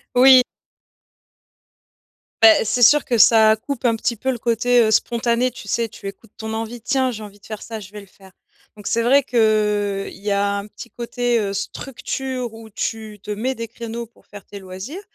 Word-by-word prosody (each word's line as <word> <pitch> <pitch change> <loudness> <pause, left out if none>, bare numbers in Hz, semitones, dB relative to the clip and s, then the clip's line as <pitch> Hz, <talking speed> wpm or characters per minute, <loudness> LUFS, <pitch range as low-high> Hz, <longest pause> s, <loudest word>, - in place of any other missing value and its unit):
Oui. 260 +1 +8 2.0
Bah 220 -1 +7
c'est 245 +3 +1
sûr 295 +5 +6
que 240 - 0
ça 220 -1 +6
coupe 260 +4 -6
un 230 -2 +3
ptit 235 +1 -2
peu 260 +4 -3
le 245 - -4
côté, 240 +1 +2
heu, 215 - +1
spontané, 235 +2 +1
tu 230 -4 -12
sais, 230 +3 -1
tu 200 - -10
écoutes 200 +2 -11
ton 220 0 -5
envie, 225 +1 -5
tiens, 265 +1 0
j'ai 220 -3 -6
envie 205 -1 -12
de - - -20
faire 215 -1 -7
ça, 225 -1 -7
je 195 -2 -12
vais 210 - -9
le 200 - -13
faire, 190 0 -19 0.4
donc 210 -1 -14
c'est 230 - +1
vrai 270 +4 +4
que 210 -4 +1
il 190 - -14
y 210 - -2
a 200 0 +1
un 200 - -8
petit 235 +3 -12
côté, 240 0 -1
heu, 200 -2 -2
structure 255 +3 -5
où 225 0 -12
tu 215 0 -5
te 210 - -6
mets 245 +6 -2
des 230 -1 -5
créneaux 230 +1 -7
pour 230 - -27
faire 205 -1 -12
tes 200 - -10
loisirs, 190 - -8
225 Hz, 205 wpm, -20 LUFS, 210-240 Hz, 2.0 s, Oui